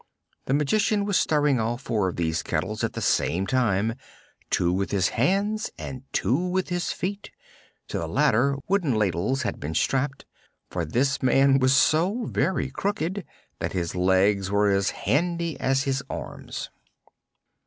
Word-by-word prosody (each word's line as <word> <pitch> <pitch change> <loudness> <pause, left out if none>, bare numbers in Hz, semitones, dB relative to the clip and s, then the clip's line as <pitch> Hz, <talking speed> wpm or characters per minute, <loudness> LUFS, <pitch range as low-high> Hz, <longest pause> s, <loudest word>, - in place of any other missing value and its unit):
The 135 - +1
Magician 200 +7 +1
was 200 -2 0
stirring 145 -6 +2
all 115 +2 -1
four 110 -6 -1
of 90 - -3
these 80 -2 -1
kettles 105 +8 -2
at - - -1
the - - -4
same 90 +6 +1
time, 110 -3 +1 0.6
two 90 0 +2
with 95 +1 -1
his 95 -2 +1
hands 200 - 0
and 130 -2 -6
two 125 - +1
with 185 +1 -1
his 175 -1 -1
feet, 200 +2 -4 0.6
to - - -2
the - - -3
latter, 140 +5 +2
wooden 180 - +1
ladles 105 - 0
being 80 +2 -4
strapped, 135 +1 0 0.5
for 85 -2 -2
this 135 - 0
man 135 +1 +4
was 130 +1 +4
so 180 - +3
very 135 -2 -1
crooked 190 +3 -2 0.4
that - - -3
his 85 -2 -2
legs 95 +2 +2
were 100 0 +3
as 100 -1 +2 0.2
handy 170 +1 0
as 135 0 +1
his 135 -1 -1
arms. - - -6
130 Hz, 155 wpm, -25 LUFS, -, 0.6 s, man